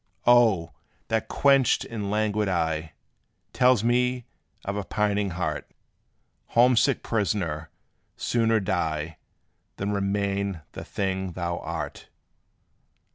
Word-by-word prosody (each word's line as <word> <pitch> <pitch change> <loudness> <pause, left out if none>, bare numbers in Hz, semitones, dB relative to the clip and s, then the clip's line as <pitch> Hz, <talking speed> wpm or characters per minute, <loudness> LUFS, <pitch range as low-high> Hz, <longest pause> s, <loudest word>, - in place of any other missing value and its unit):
Oh! 115 -8 +5 0.4
that 110 -1 0
quenched 135 -3 +3
and 105 -4 -4
languid 105 -1 0
eye 80 -3 -1 0.6
Tells 125 -4 +4
me 125 +1 +1 0.4
of 100 - -2
a 105 - -2
pining 105 0 0
heart: 80 -4 -3 0.9
Homesick 125 +2 +4
prisoner, 90 -8 -1 0.5
sooner 115 -2 +2
die 80 -4 -2 0.6
Than 100 +1 -2
remain 100 -3 -1
the - - -7
thing 95 -2 -2
thou 85 0 -3
art. - - -5
100 Hz, 100 wpm, -26 LUFS, 90-115 Hz, 0.9 s, Oh